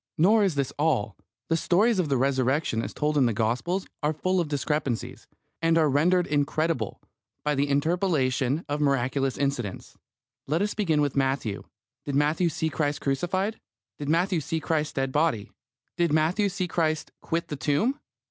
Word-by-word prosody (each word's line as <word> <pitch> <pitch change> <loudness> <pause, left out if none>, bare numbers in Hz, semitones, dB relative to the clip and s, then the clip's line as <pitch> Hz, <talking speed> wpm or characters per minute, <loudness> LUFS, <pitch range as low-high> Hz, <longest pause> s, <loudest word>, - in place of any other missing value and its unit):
Nor 210 +7 +5
is 190 -6 +1
this 140 -2 -1
all. 130 -10 +1 0.3
The 165 - +3
stories 195 +6 +2
of 165 -5 0
the 135 - +2
Resurrection 130 -1 +1
as - - -5
told 150 0 0
in 130 - +4
the 115 - 0
Gospels 120 - -1 0.2
are 150 +1 +1
full 185 +4 0
of 170 - 0
discrepancies, 145 -4 -2 0.3
and 165 0 +3
are 155 -3 +3
rendered 175 +6 +3
incredible 145 - -1 0.5
by 150 - +2
the 140 0 0
interpolation 145 -2 +1
of 145 0 -2
miraculous 135 -1 +1
incidents. 130 -8 -3 0.5
Let 160 +7 +1
us 210 - -1
begin 165 -8 +1
with 145 -2 0
Matthew. 135 -6 -1 0.4
Did 140 - -3
Matthew 155 +4 +2
see 160 +1 -2
Christ 145 0 -1
crucified? 180 +10 -1 0.4
Did 145 -1 -4
Matthew 175 +2 +2
see 160 +3 -2
Christ's 155 -1 -1
dead 135 -1 -1
body? 145 -8 0 0.5
Did 170 -2 +2
Matthew 165 +7 +2
see 185 -1 -2
Christ 155 -3 -1
quit 165 +1 -2
the 150 - -3
tomb? 155 - 0
150 Hz, 165 wpm, -26 LUFS, 135-170 Hz, 0.5 s, Nor